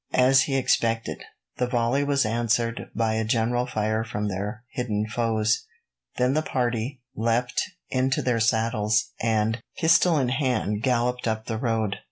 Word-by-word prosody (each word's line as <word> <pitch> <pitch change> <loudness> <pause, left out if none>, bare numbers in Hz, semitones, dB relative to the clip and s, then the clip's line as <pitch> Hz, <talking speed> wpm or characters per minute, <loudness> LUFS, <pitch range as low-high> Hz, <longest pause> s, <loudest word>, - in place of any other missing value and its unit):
As 130 +1 +6
he 135 -2 0
expected, 115 -3 0 0.3
the 125 - 0
volley 125 +3 +1
was 140 -3 +2
answered 115 +1 0
by 110 -1 +1
a 110 0 0
general 120 +2 +1
fire 110 -2 -1
from 105 -2 -3
their 100 +4 -4
hidden 110 -4 -1
foes. 110 -1 0 0.5
Then 125 +1 +2
the 155 - +2
party 125 -1 -2
leapt 115 +3 0 0.3
into 130 +1 +1
their 120 -2 +1
saddles, 110 -1 +1
and, 110 0 +1 0.2
pistol 165 0 +4
in 130 -4 +1
hand, 125 -6 0
galloped 125 -1 0
up 110 0 -2
the 110 -2 -3
road. 110 -4 0
115 Hz, 150 wpm, -25 LUFS, 110-125 Hz, 0.5 s, As